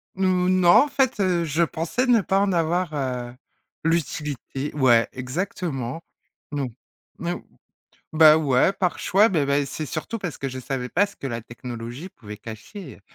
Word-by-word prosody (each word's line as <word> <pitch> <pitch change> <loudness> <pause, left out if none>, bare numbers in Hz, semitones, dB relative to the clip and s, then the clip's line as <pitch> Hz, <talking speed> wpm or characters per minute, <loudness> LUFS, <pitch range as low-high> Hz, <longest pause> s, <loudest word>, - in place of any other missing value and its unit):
N 190 0 0
ou, 180 -1 +2
non 185 -2 +4
en 230 +11 +7
fait, 265 -5 +1
heu, 180 -3 +2
je 160 +1 +1
pensais 165 +10 -1
ne 240 -4 +4
pas 195 0 +1
en 200 0 +2
avoir, 170 0 0
heu, 125 -4 -3 0.5
l'utilité 150 -3 -2
ouais 120 -5 +4
exactement. 135 0 -4 0.5
Non. 145 -3 -2 0.5
No 175 +1 -3 0.7
ou - - -7
bah 155 -1 +9
ouais, 145 +3 +3
par 180 -2 -1
choix, 205 +4 +4
bah 155 -8 +1
bah 140 +1 +2
c'est 155 +3 -5
surtout 155 +11 -4
parce 175 -7 -5
que 135 - -3
je 130 0 -6
savais 130 -1 -4
pas 200 +10 +2
ce 205 - -15
que 140 - -6
la 115 -2 -4
technologie 120 +6 -7
pouvait 105 - -11
cacher. 115 - -10
155 Hz, 175 wpm, -24 LUFS, 130-185 Hz, 0.7 s, bah